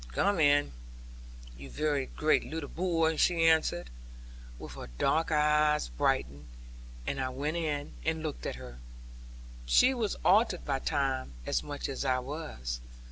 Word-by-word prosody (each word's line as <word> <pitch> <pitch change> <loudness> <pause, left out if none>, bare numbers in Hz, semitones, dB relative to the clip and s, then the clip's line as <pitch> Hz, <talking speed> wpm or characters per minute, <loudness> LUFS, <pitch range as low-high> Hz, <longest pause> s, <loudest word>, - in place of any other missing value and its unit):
'Come 200 - +2
in, 145 - +4 0.8
you 70 +2 -10
very 140 - -1
great 155 0 +2
leetle 160 -2 -5
boy,' 165 -3 +1
she 170 0 +3
answered, 160 - +2 0.7
with - - -9
her - - -8
dark 160 - +1
eyes 150 - +3
brightened. 65 +3 -1 0.6
And 135 - -2
I 130 - -1
went 145 +6 -3
in, 150 -3 -2
and 160 0 -1
looked 155 -3 -4
at - - -3
her. - - -10 0.9
She 155 - +5
was 230 -5 -1
altered 200 -2 +3
by 135 -2 0
time, 135 - -1
as - - 0
much 145 -1 -5
as 135 - -3
I 130 -2 +2
was. 125 - -5
150 Hz, 145 wpm, -30 LUFS, 130-160 Hz, 0.9 s, She